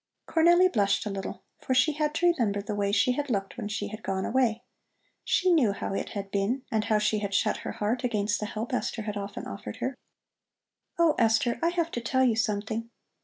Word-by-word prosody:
Cornelli 345 +3 +5
blushed 200 -3 +2
a 210 - -2
little, 195 -1 -5 0.2
for 260 - -1
she 255 +5 +4
had 300 0 -1
to 350 - +1
remember 210 -9 0
the 200 +1 -4
way 200 -1 0
she 205 +5 +3
had 290 +3 -2
looked 195 -4 -2
when 230 -4 -4
she 215 - -3
had 215 +1 -8
gone 190 -2 -2
away. 235 -2 +1 0.6
She 370 -1 +2
knew 260 -12 +4
how 195 - -4
it - - -3
had 200 -1 -5
been 205 +7 0
and 220 -1 +1
how 215 - +3
she 210 0 +1
had 200 -1 -3
shut 215 +1 +2
her - - -6
heart 220 +5 -1
against 210 -4 0
the 210 - -3
help 220 +4 -5
Esther 235 -2 -2
had 210 -1 -4
often 200 0 -5
offered 100 +1 -7
her. 260 - -3 1.0
"Oh, 335 -2 +4
Esther, 225 +1 +2
I 335 - +3
have 340 -1 -1
to 240 - -3
tell 260 +3 +1
you 235 -3 +3
something. 220 +1 -1
220 Hz, 220 wpm, -28 LUFS, 205-260 Hz, 1.0 s, Cornelli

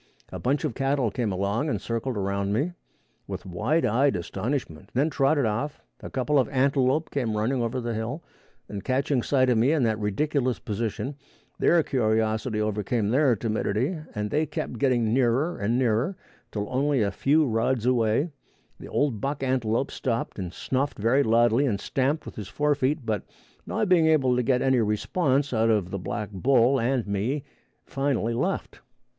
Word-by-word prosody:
A - - -5
bunch 140 +5 0
of 150 -6 -1
cattle 135 -3 0
came 115 -2 -1
along 100 +10 -1
and - - -1
circled 115 +1 -3
around 100 0 -1
me 145 +11 0 0.6
with - - -6
wide 110 - 0
eyed 135 +6 +2
astonishment, 95 - -4
then 145 +5 +2
trotted 140 0 +2
off; 115 +7 -2 0.2
a - - -8
couple 140 +2 +1
of 130 - +1
antelope 135 +2 +1
came 115 -6 -1
running 120 +4 0
over 115 +2 -1
the 120 -1 -3
hill, 115 +9 -4 0.4
and 100 -2 -6
catching 135 0 +1
sight 130 +1 +2
of 115 - +3
me 125 +6 +4
in 155 -5 +2
that 110 -2 +1
ridiculous 130 +5 0
position, 115 +6 -4 0.4
their 170 -1 +4
curiosity 110 -2 0
overcame 105 +1 0
their 130 0 +3
timidity 110 - -1 0.2
and 105 0 -2
they 155 +1 +1
kept 125 -5 -4
getting 120 -5 +2
nearer 130 +6 +1
and 110 +4 +1
nearer, 125 - +1 0.4
till 105 -1 -3
only 135 -1 +2
a 100 - 0
few 150 +9 +3
rods 115 0 0
away, 125 +5 +2 0.5
the - - -9
old 135 -8 0
buck 140 0 -2
antelope 130 -1 0
stopped 115 -4 -3
and 90 -2 -4
snuffed 135 +8 -2
very 115 +7 +3
loudly 120 +2 +3
and 100 -5 0
stamped 140 +8 -1
with - - -9
his 105 -3 -5
fore 150 +6 +1
feet, 140 0 -1
but, 110 -2 -1 0.5
not 215 - 0
being 175 -3 +4
able 135 -6 +3
to 125 - +2
get 125 +1 +1
any 130 -2 +3
response 130 - 0
out 115 0 +2
of 100 -5 +1
the 100 - -3
black 105 +3 -4
bull 125 +5 +3
and 125 0 0
me, 105 +8 -1 0.4
finally 135 -4 -1
left. 115 - -2
125 Hz, 175 wpm, -26 LUFS, 110-140 Hz, 0.6 s, me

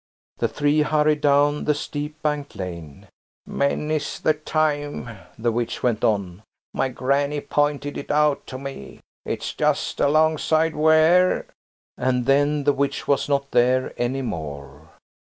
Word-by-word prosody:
The - - +2
three 145 +1 +1
hurried 150 0 +2
down 145 0 +3
the 150 - +2
steep 150 +1 -5
banked 150 -3 -2
lane. 85 -7 -8 0.4
"Many's 150 +2 -1
the 155 - +2
time," 150 -2 -1 0.3
the 115 +1 0
witch 115 0 -3
went 115 -3 0
on, 100 -3 0 0.3
"my 135 - 0
granny 140 +3 0
pointed 145 0 -1
it - - -9
out 150 -1 +2
to 130 - -6
me. 135 - -9 0.3
It's - - -3
just - - 0
alongside 155 +1 +2
where–" 160 +4 +4 0.5
And 125 -1 0
then 145 +2 +2
the 145 0 +3
witch 140 0 -2
was 140 +1 +1
not 140 -1 0
there 125 +1 +2
any 130 +3 -2
more. 75 - -7
145 Hz, 135 wpm, -23 LUFS, 125-150 Hz, 0.5 s, where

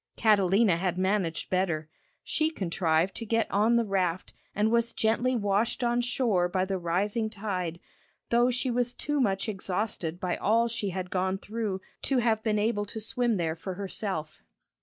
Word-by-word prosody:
Catalina 200 -3 +4
had 180 0 -1
managed 185 -3 0
better. 170 -5 0 0.4
She 310 0 0
contrived 170 - 0
to 230 - -3
get 225 0 +1
on 215 +4 +3
the 235 -1 +3
raft 185 -3 -1 0.2
and 210 +2 +2
was 235 0 +2
gently 235 +3 +1
washed 210 +2 0
on 240 0 +2
shore 235 -8 +1
by 185 +1 0
the 190 -1 -2
rising 200 +6 0
tide, 185 -6 -3 0.5
though 240 +1 +4
she 255 +1 -1
was 245 0 0
too 295 0 -1
much 195 -3 0
exhausted 190 -4 -2
by 180 -1 -1
all 230 +3 +3
she 230 -3 -2
had 185 0 -4
gone 190 +1 0
through 210 -2 -4 0.2
to 270 - 0
have 225 -3 +2
been 215 -1 0
able 210 0 +1
to 220 +2 -6
swim 230 +1 +1
there 165 -2 -1
for 185 +3 -6
herself. 190 -5 -3
205 Hz, 170 wpm, -28 LUFS, 185-230 Hz, 0.5 s, Catalina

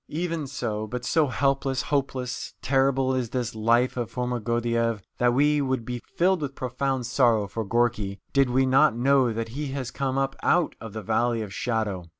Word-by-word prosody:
Even 165 -2 -2
so, 110 -5 -3
but 125 +2 -5
so 155 +2 +3
helpless, 135 0 0
hopeless, 130 -3 -2
terrible 135 0 +2
is 125 -3 -1
this 125 -2 -2
life 115 +3 +2
of 120 -3 -3
Foma 125 -1 -2
Gordyeeff 115 -1 0 0.2
that 120 0 +4
we 145 +2 +3
would 130 -4 -1
be 125 0 -4 0.2
filled 185 0 +3
with 140 -2 -4
profound 130 0 -2
sorrow 120 -4 +2
for 110 +3 -4
Gorky 110 -3 0
did 135 -2 +4
we 130 +2 +3
not 130 -1 +4
know 130 -1 +3
that 115 0 -3
he 145 +5 -4
has 130 -3 -4
come 135 0 -2
up 135 0 0
out 175 -2 +2
of 115 -3 -8
the 110 -1 -5
Valley 115 +2 +1
of 100 -2 -8
Shadow. 110 -7 -2
125 Hz, 185 wpm, -26 LUFS, 115-135 Hz, 0.2 s, that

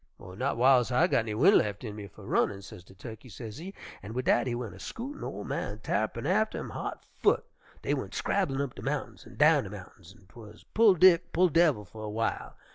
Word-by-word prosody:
"'Not 115 +10 -3
w'iles 125 0 +4
I 125 +7 +4
got 180 - +2
any 110 -2 -3
wind 175 - +6
lef' 105 +1 -1
in 105 -3 -6
me 105 -1 -7
fer 100 +2 -15
runnin',' 100 0 0
sez 90 -2 -11
de 95 - -18
Tukkey, 115 +4 -10
sezee, 120 - -8 0.3
an' 105 +4 -8
wid 130 - -2
dat 120 - +3
he 120 - -1
went 120 -3 -5
a - - -13
scootin', 270 +5 -7
ol' 100 - -5
man 105 +1 -4
Tarr'pin 110 +3 -2
atter 215 +6 +1
him, - - -6
hot - - -6
foot. - - +2 0.4
Dey - - 0
went - - -4
scrabblin' 145 -9 0
up 140 -3 -3
de - - -10
mountains - - -4
an' - - -14
down - - +4
de - - -7
mountains, 95 +3 -12
an' 95 - -22
'twuz 105 +1 -14
pull 215 -3 +6
Dick, 180 -1 +5
pull 180 +2 +4
devil, 155 -10 +3
fer 110 +4 -13
a 110 - -5
w'ile. 115 +2 -3
120 Hz, 225 wpm, -29 LUFS, 105-165 Hz, 0.4 s, wind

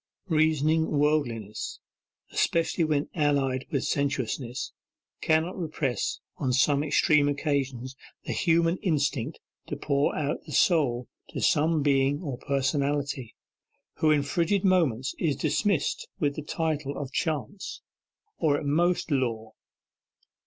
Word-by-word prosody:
Reasoning 155 0 +2
worldliness, 140 -8 -1 0.5
especially 165 +1 +1
when 150 -2 +1
allied 140 -4 +1
with 140 - -1
sensuousness, 130 -2 -2 0.5
cannot 160 +3 +2
repress 155 - -2 0.2
on 130 -2 0
some 140 +3 +3
extreme 150 -1 +3
occasions 135 -3 -2 0.3
the - - -4
human 170 +1 +2
instinct 145 - -1 0.3
to - - -3
pour 140 0 +1
out 145 -1 -2
the - - -8
soul 130 -9 +2 0.2
to - - -5
some 155 0 +2
Being 140 0 +2
or 135 -6 -4
Personality, 140 -2 -1 0.6
who 155 - +3
in 150 -2 +4
frigid 170 +6 +1
moments 145 - +2
is 155 -5 +1
dismissed 160 +2 0
with 145 -2 +1
the - - -4
title 150 -2 -2
of 140 -2 -5
Chance, 160 +5 -3 0.6
or 150 -3 +3
at - - -5
most 170 +4 +1
Law. 115 -5 -1
145 Hz, 120 wpm, -27 LUFS, 135-160 Hz, 0.6 s, in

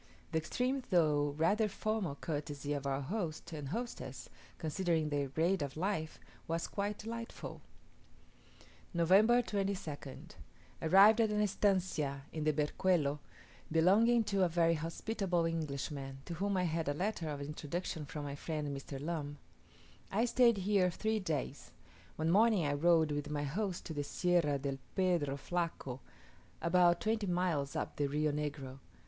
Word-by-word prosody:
The 160 - +2
extreme 255 - -1
though 150 -5 +3
rather 205 +7 +3
formal 205 -7 -2
courtesy 145 -1 -4
of 140 -1 -3
our 135 0 0
host 170 0 -4
and 145 -3 -5
hostess, 235 - -5 0.3
considering 160 -1 0
their 145 -1 0
grade 165 +7 +1
of 140 0 -4
life, 165 -3 -2 0.3
was 165 +1 -1
quite 205 +1 -3
delightful. 230 +1 -7 1.3
November 205 +8 +5
22nd. 195 - -4 0.5
Arrived 200 +7 +7
at 220 - +3
an 210 0 0
estancia 185 -9 +1
on 155 -1 -2
the 155 - +4
Berquelo 150 0 +1 0.5
belonging 210 +9 +5
to 200 -2 +1
a 180 - +3
very 165 0 +3
hospitable 175 +2 -1
Englishman, 140 -4 -3
to 170 - -5
whom 195 +3 -1
I 180 - +2
had 165 -3 -1
a 145 - -1
letter 180 -2 -2
of 145 -1 -4
introduction 150 +2 -4
from 150 0 -5
my 140 -1 -4
friend 150 -1 -3
Mr. 135 0 -7
Lumb. 145 -1 -4 0.7
I 220 +5 +2
stayed 240 -2 +4
here 195 -1 +2
three 220 +5 -1
days. 150 -6 -4 0.4
One 160 +1 0
morning 210 -3 +4
I 145 - +1
rode 160 +1 +4
with 145 0 -2
my 145 -1 -2
host 180 +6 -2
to 160 - -5
the 145 -1 -2
Sierra 170 -2 +1
del 135 0 -3 0.2
Pedro 170 -7 +1
Flaco, 155 -4 -3 0.6
about 175 0 +4
twenty 220 -1 0
miles 175 -6 0
up - - -3
the 145 - +1
Rio 150 +2 +1
Negro. 145 -3 -4
165 Hz, 150 wpm, -34 LUFS, 145-195 Hz, 1.3 s, Arrived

